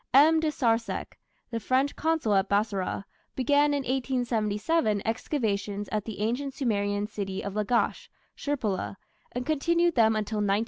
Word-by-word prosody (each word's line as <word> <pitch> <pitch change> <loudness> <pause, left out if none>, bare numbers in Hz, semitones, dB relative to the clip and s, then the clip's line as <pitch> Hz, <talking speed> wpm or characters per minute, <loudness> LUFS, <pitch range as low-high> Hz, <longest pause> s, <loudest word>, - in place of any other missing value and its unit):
M. 315 +4 +7
de 315 -1 +1
Sarzec, 230 -5 -1 0.3
the 230 - -1
French 260 +5 +1
consul 320 -9 +1
at 195 0 +2
Bassorah, 200 -2 0 0.3
began 285 +3 +3
in 285 -1 +1
1877 240 -1 0
excavations 210 -4 -1
at 210 -1 -1
the 215 -2 -6
ancient 260 +5 -1
Sumerian 205 -6 0
city 195 -2 -4
of 200 - -4
Lagash 215 +3 0 0.3
(Shirpula), 220 -10 -2 0.4
and 245 0 -4
continued 340 +3 +2
them 220 -4 +4
until 215 0 -2
1900. 205 0 +2
230 Hz, 140 wpm, -28 LUFS, 205-280 Hz, 0.4 s, M